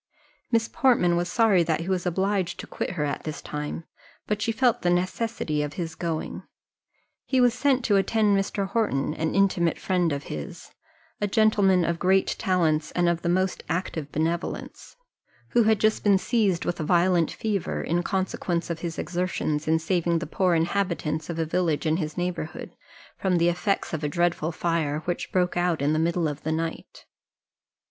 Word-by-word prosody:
Miss 230 -1 +2
Portman 210 -10 +3
was 175 +1 -1
sorry 220 -6 +4
that 165 -1 0
he 170 - -6
was 185 -2 -1
obliged 190 +1 0
to - - -6
quit - - -4
her 150 -3 0
at 145 - -3
this 155 -2 -5
time, 150 +2 -5 0.4
but 210 0 -2
she 225 - +1
felt 245 0 +2
the 175 - +1
necessity 180 -3 -1
for 150 0 -5
his 165 -3 -4
going; 165 -1 -4 0.8
he 260 - +1
was 245 -2 +5
sent 265 +1 +2
for 240 - -3
to 205 - +5
attend 210 +1 +2
Mr. 195 0 -1
Horton, 175 - 0
an 160 0 -2
intimate 185 -4 +2
friend 180 -3 0
of 140 0 -3
his, 75 -1 -7 0.5
a 205 - +2
gentleman 200 -4 +3
of 170 0 -1
great 190 +1 +2
talents, 160 -5 +1
and 175 -1 +2
of 170 -1 +1
the 170 - -1
most 185 +1 +1
active 160 -4 -3
benevolence, 165 +3 -3 0.5
who 240 - +3
had 220 -1 +3
just 215 0 +2
been 200 -2 +5
seized 200 -4 +1
with 175 - -2
a - - -1
violent 175 0 +3
fever, 210 -4 -2
in 170 +2 0
consequence 180 -2 -2
of 165 - -4
his 165 -1 -5
exertions 175 -4 -2
in 160 +1 +4
saving 170 0 0
the 165 - -3
poor 180 +2 +1
inhabitants 165 -3 -1
of 170 - -3
a 165 - 0
village 165 -1 0
in 160 +1 +2
his 155 -2 -4
neighbourhood 175 -3 -4 0.5
from 185 -2 +1
the 170 0 +3
effects 185 +3 -1
of 160 -1 -3
a 150 - 0
dreadful 170 0 0
fire, 160 -3 -1
which 175 - -3
broke 180 -1 +1
out 175 -2 +1
in 145 +2 +1
the 155 - +1
middle 170 0 +1
of 150 -1 -5
the 155 - -2
night. 165 +1 -4
175 Hz, 185 wpm, -25 LUFS, 160-195 Hz, 0.8 s, was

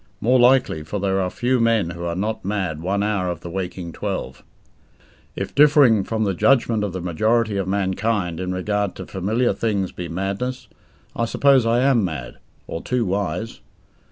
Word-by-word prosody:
More 125 +3 +3
likely, 125 -10 +4
for 80 +7 -4
there 95 0 0
are 90 - -1
few 125 +6 0
men 115 -6 +2
who 85 -1 -6
are 85 0 -2
not 105 +4 -3
mad 95 -6 -2
one 100 +4 0
hour 100 -4 0
of 85 -2 -5
the 85 - -7
waking 90 -2 -5
twelve. - - -5 0.9
If - - -4
differing 140 -8 +5
from 110 -1 -1
the 100 -2 0
judgment 115 +1 +2
of 105 - -2
the 90 0 -5
majority 110 +5 +1
of 95 -2 -2
mankind 95 -2 -1
in 90 0 -3
regard 100 +2 -1
to - - -7
familiar 110 +6 0
things 100 -5 -1
be 90 - -6
madness, 100 +9 -3 0.5
I 115 - 0
suppose 135 0 +3
I 120 +2 +3
am 130 -5 +3
mad 75 -9 -5 0.3
or 80 - -5
too 125 -2 -1
wise. 100 +2 -3
100 Hz, 180 wpm, -22 LUFS, 90-115 Hz, 0.9 s, differing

